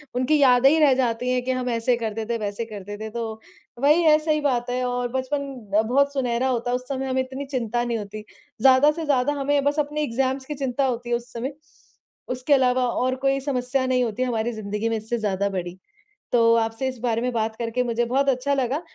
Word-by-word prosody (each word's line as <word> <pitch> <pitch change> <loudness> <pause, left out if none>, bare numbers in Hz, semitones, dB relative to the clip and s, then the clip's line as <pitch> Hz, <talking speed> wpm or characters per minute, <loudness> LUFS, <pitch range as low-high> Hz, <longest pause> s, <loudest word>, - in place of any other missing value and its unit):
उनकी 255 +5 +2
यादें 260 0 +6
ही 320 +2 +3
रह 285 -4 +5
जाती 250 -1 0
हैं 250 0 +1
कि 260 - -1
हम 255 -1 -2
ऐसे 235 +1 +1
करते 220 -1 -3
थे, 235 +1 -2
वैसे 210 +2 -3
करते 205 -2 -8
थे 220 +1 -6
तो 220 -1 -5 0.4
वही 300 +5 +4
है, 305 -1 +6
सही 305 -1 0
बात 250 -3 0
है 250 +1 -1
और 245 0 -1
बचपन 270 +2 -2 0.4
बहुत 280 +3 +2
सुनहरा 250 -1 0
होता 245 -1 -1
है, - - +2
उस 250 0 -5
समय 270 -1 -3
हमें 260 0 +1
इतनी 265 +2 -6
चिंता 240 -3 -2
नहीं 235 -1 -1
होती। 210 0 -7 0.4
ज़्यादा 265 +3 +6
से 325 0 -5
ज़्यादा 285 0 +2
हमें 280 0 +1
बस 290 +1 +1
अपने 300 +1 -1
एग्ज़ाम्स 265 +1 -1
की 300 - -5
चिंता 270 0 -1
होती 240 -1 -2
है 240 - +2
उस 235 0 -6
समय, 255 +4 -4 0.8
उसके 255 +3 0
अलावा 255 -2 +3
और 255 +2 0
कोई 275 0 +3
समस्या 260 -1 -1
नहीं 255 -1 +2
होती 235 +1 -3
है - - -1
हमारी 230 0 -1
ज़िंदगी 210 +1 -3
में 225 - 0
इससे 220 +2 -3
ज़्यादा 200 -2 -1
बड़ी। 180 -1 -5 0.6
तो 230 -1 +5
आपसे 225 +3 -1
इस 255 -2 -6
बारे 230 -1 0
में 250 0 -1
बात 220 -1 -1
करके 235 +1 -1
मुझे 235 0 0
बहुत 275 +3 +1
अच्छा 270 +2 +1
लगा, 270 +3 0
250 Hz, 225 wpm, -24 LUFS, 230-270 Hz, 0.8 s, यादें